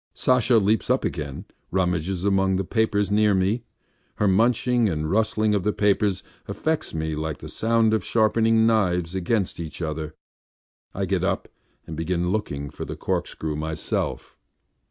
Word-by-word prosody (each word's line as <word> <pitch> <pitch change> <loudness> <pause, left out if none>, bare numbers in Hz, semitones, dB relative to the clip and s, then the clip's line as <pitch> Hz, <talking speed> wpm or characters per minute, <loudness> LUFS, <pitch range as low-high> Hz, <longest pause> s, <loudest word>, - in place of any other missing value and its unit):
Sasha 125 -1 +3
leaps 110 +2 +2
up 130 +1 +2
again 75 -4 -2
and 75 +8 -8 0.2
rummages 90 0 -1
among 95 -1 +2
the 95 - 0
papers 105 0 0
near 105 -1 +4
me. 95 +6 +1 0.5
Her 105 - +1
munching 115 +3 +3
and 75 -2 -2
rustling 110 0 +2
of 100 - +1
the 105 - +1
papers 100 -2 +1 0.2
affects 160 0 -2
me 80 -1 -2
like 80 -2 -3
the - - -9
sound 115 -1 +2
of 110 -4 +1
sharpening 110 +1 +3
knives 90 -6 +1
against 95 +1 -1
each 80 -2 -6
other.... 80 -2 -4 0.8
I - - -2
get - - 0
up - - -1 0.4
and 80 - -7
begin 85 +2 -1
looking 70 -9 -3
for - - -7
the - - -6
corkscrew 80 -1 -3
myself. 80 +1 -3
95 Hz, 155 wpm, -24 LUFS, 80-110 Hz, 0.8 s, near